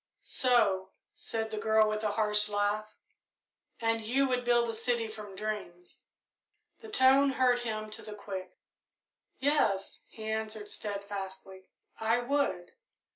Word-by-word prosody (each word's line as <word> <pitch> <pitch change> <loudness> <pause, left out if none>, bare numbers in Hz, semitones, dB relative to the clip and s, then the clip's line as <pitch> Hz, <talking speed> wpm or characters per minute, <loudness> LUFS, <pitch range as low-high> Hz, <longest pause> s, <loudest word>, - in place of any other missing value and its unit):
"So," 210 -7 +2 0.2
said 220 -1 -3
the 215 - -3
girl, 220 0 +4
with 215 0 -2
a 215 - +2
harsh 210 -1 +2
laugh, 210 +1 -1 0.8
"and 225 0 +1
you 260 +5 +2
would 250 -1 0
build 240 -1 +3
a 230 - -2
city 230 0 0
from 210 -2 -9
dreams?" 190 -4 -6 0.7
The 445 - -11
tone 275 -6 +5
hurt 255 -2 +3
him 215 -2 -4
to 215 - -5
the 210 - -8
quick. 190 -3 -7 0.8
"Yes," 260 -9 +1
he 220 - -11
answered 215 -1 -3
steadfastly, 195 -2 -6 0.3
"I 225 +2 +2
would. 245 -8 0
215 Hz, 130 wpm, -31 LUFS, 205-240 Hz, 0.8 s, tone